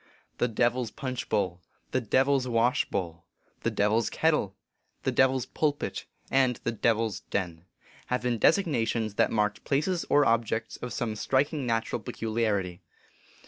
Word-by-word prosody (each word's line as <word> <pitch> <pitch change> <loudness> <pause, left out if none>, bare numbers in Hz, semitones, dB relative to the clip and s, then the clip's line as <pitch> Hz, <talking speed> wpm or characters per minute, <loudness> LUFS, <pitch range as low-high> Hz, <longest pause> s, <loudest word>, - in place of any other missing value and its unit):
" - - -41
The 120 - +3
Devil 120 +2 +1
s 120 - -3
Punch 130 0 -5
bowl," 95 -4 0
" - - -41
The 130 - +1
Devil 135 +5 +3
s 130 -1 -3
Wash 120 +1 +2
bowl," 85 -2 -4 0.2
" - - -39
The - - +1
Devil 105 +2 +2
s 115 - -1
Ket 160 - +2
tle," 100 -10 -1 0.5
"The - - +1
Devil 130 0 +4
s 130 - -2
Pulpit," 145 -2 -2 0.2
and 130 -2 +3
" - - -37
The 115 - 0
Devil 115 0 +2
s 110 - -4
Den," 85 -3 -3 0.4
have 125 0 -1
been 120 -2 0
designations 115 - +2
that - - +4
marked 105 -1 0
places 165 +5 0
or 145 0 +5
objects 115 -1 0
of 125 - -6
some 115 -3 -2
striking 135 +4 0
natural 115 -1 -1
peculiarity. 105 -5 -2
115 Hz, 185 wpm, -28 LUFS, 105-130 Hz, 0.5 s, or